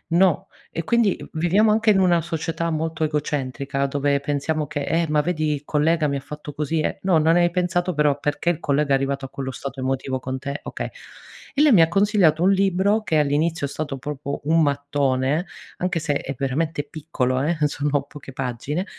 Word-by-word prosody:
no, 180 -3 +3 0.2
e 165 - -3
quindi, 235 -1 +2
uhm, - - -9
viviamo 180 +7 +3
anche 220 0 +4
in 195 - +3
una 175 -3 +4
società 165 0 -3
molto 160 0 -2
egocentrica, 140 -2 -1
dove 140 0 +1
pensiamo 145 +2 -1
che: 145 0 -4
"Eh, 165 +1 +1
ma 150 -1 +3
vedi 155 -3 0
i 140 - -7
collega 155 +1 +2
mi 140 - -1
ha 140 - -1
fatto 150 0 -8
così 150 +2 -1
e" - - -1
no, 180 -4 +4
non 160 +2 +4
hai 175 0 +3
pensato 180 0 0
però 150 -1 +2
perché 150 +4 -1
il 170 - 0
collega 140 0 0
è - - +6
arrivato 135 0 -1
a 135 - -9
quello 135 -1 -5
stato 135 0 -7
emotivo 130 0 -2
con 130 +1 -4
te, 140 +2 -5
okay, - - -5 0.7
e - - +4
lei 300 -2 +6
mi 175 - +7
ha 165 - +6
consigliato 185 -4 +3
un 190 - +5
libro 195 +2 +2
che 160 - +1
all'inizio 150 +2 +1
è - - -11
stato 145 -3 -4
proprio 140 0 -5
un 165 +1 +3
mattone, 140 +1 0 0.3
anche 180 -2 -1
se 155 -2 -1
è 135 -1 -3
veramente 145 +3 -1
piccolo 135 -5 -2
eh, 160 +3 0
sono 145 -1 -1
poche 140 -2 -12
pagine. 135 - -3
150 Hz, 200 wpm, -23 LUFS, 140-170 Hz, 0.7 s, mi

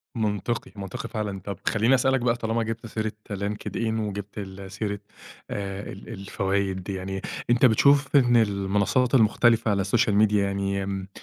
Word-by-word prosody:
منطقي، 110 +1 -2
منطقي 95 -2 -6
فعلًا. 105 -3 -3
طب، 100 0 -6
خلِّيني 115 +4 +4
أسألك 130 +1 +2
بقى، 120 0 +2
طالما 115 0 -1
جِبت 115 +1 -4
سيرة 110 -1 -2 0.2
LinkedIn، 105 +3 -2
وجِبت 105 -1 -5
ال 95 -1 -7
سيرة 100 0 -3 0.5
آآ، 100 0 -4
ال 100 - -11
الفوايد، 95 -1 -2
يعني، 95 0 -4 0.3
أنت 120 +3 +5
بتشوف 140 +5 +4
إن 120 -3 +5
المنصات 100 +4 +2
المختلفة 115 -1 +4
على 100 -1 +1
السوشيال 105 +2 +2
ميديا 105 -1 +4
يعني 100 0 -1
آمم، 95 -1 -4
105 Hz, 150 wpm, -25 LUFS, 100-115 Hz, 0.5 s, أنت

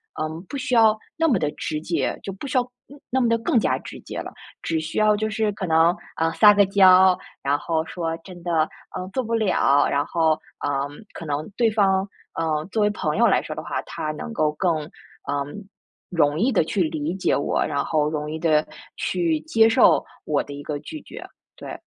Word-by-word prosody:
呃， 155 - -2 0.2
不 - - -6
需 255 -1 -3
要 220 -2 +6 0.2
那 325 0 +3
么 250 -9 +3
的 150 - 0
直 155 -1 -3
接 170 +1 -1
就 195 - -4
不 195 +9 -8
需 260 - 0
要 - - +1 0.3
嗯， 285 +1 -14
那 260 - +1
么 245 - +2
地 230 - +3
更 230 +1 +2
加 - - +1
直 - - -10
接 - - -8
了， - - -6 0.3
只 165 -1 -1
需 155 0 -5
要 215 0 +4
就 215 +1 -1
是 215 -1 0
可 195 -1 -4
能， 165 +2 +4 0.2
呃， 165 0 +1
撒 210 -1 +7
个 205 0 +5
娇， 185 -1 +6 0.2
然 140 +1 +1
后 160 +2 -1
说 165 -2 -3
真 180 -2 -11
的， 165 -3 +1 0.3
嗯， 185 - -5
做 260 - 0
不 230 0 -4
了， 185 -10 +3
然 140 +1 +1
后， 160 -2 +2 0.3
嗯， 145 +4 -3
可 165 - -8
能 150 +1 -3
对 235 -2 +3
方， 195 -2 +2 0.3
嗯， 155 -1 -1
作 215 +1 +1
为 210 - +3
朋 155 -7 -2
友 - - +5
来 - - +3
说 - - -6
的 - - -6
话， - - -3
他 155 - -5
能 155 +9 -7
够 155 -9 +1
更， 170 +2 +1 0.5
呃， 140 0 -1 0.7
容 150 -3 +1
易 240 +7 +2
地 - - +3
去 190 +5 -1
理 155 0 -2
解 190 - +1
我， 145 - 0
然 140 - -1
后 150 -2 +1
容 150 -1 -3
易 160 - -3
地 155 -2 +2 0.3
去 330 -3 0
接 225 -8 +4
受 240 +3 +5 0.2
我 150 -2 0
的 145 - -9
一 140 - -7
个 150 0 -3
拒 310 - -8
绝， - - -10 0.3
对。 - - -8
175 Hz, 230 characters per minute, -23 LUFS, 155-215 Hz, 0.7 s, 撒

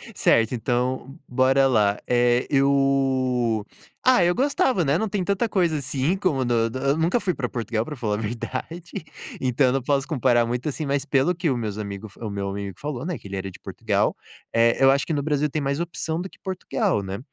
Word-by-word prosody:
Certo, 115 +2 +3
então, 125 +3 -2
bora 130 +2 +3
lá. 105 -5 +2
Eh, 120 0 +2
eu 135 -5 +2 0.4
ah, 255 -7 +5
eu 175 +1 +2
gostava, 260 - +2
né. 140 +3 +2
Não 220 +2 -1
tem 200 -2 -1
tanta 200 +5 0
coisa 175 -6 +1
assim 140 +4 0
como 155 -10 0
no 115 -1 +2
do 130 - -5
eu 140 +2 +1
nunca 170 +8 +2
fui 185 -5 -1
pra 125 -6 -3
Portugal, 115 -2 -2
pra 150 - -6
falar 110 -5 -1
a - - -3
verdade, 130 +10 -5 0.4
então 130 +1 +2
eu 125 - +2
não 135 - 0
posso 135 +1 0
comparar 125 -6 +2
muito 125 +5 -2
assim, 150 +2 -4
mas 140 -1 -1
pelo 140 +5 +2
que 170 -1 -1
o 130 - +1
meus 105 -3 -4
amigo 100 0 -5
o 110 - -4
meu 100 -1 -3
amigo 100 0 -5
falou, 140 -4 -4
né, 175 -3 -3
que - - -12
ele 100 - -5
era 95 0 -4
de - - -14
Portugal, - - -1 0.4
eh, 115 +2 +3
eu 135 - +8
acho 140 +1 +1
que 165 - -1
no 145 -2 -1
Brasil 150 0 +1
tem 155 +2 -2
mais 140 +1 -1
opção 170 -1 -3
do 190 - -6
que - - -20
Portugal, 160 - -1
né, 95 0 -4
135 Hz, 220 wpm, -24 LUFS, 120-155 Hz, 0.4 s, eu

